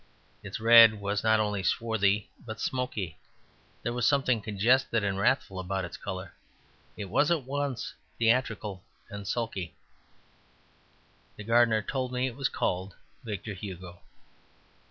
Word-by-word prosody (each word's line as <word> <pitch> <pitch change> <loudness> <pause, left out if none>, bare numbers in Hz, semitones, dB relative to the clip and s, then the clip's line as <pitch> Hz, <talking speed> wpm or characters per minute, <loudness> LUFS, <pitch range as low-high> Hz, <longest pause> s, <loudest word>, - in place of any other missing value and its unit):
Its - - -6
red 115 -1 +8
was 100 0 -2
not 110 0 +4
only 105 -2 0
swarthy, 105 -1 +1 0.2
but 110 -2 -7
smoky; 125 - -3 0.6
there 120 - -1
was 125 -2 +1
something 130 -5 +2
congested 115 +3 +2
and 100 -1 -1
wrathful 95 -1 +1
about 95 0 -2
its 85 - -8
colour. 95 -1 -6 0.6
It 105 - -4
was 145 +10 +2
at 165 -5 +1
once 140 -1 -3 0.2
theatrical 110 -5 0 0.3
and 100 -1 -7
sulky. 100 -8 -3 1.6
The 105 - -9
gardener 115 -1 +3
told 130 0 -3
me 125 0 0
it 125 -3 -4
was 135 0 0
called 95 +1 -2 0.3
Victor 105 -2 -5
Hugo. 90 -2 -8
110 Hz, 135 wpm, -29 LUFS, 100-120 Hz, 1.6 s, red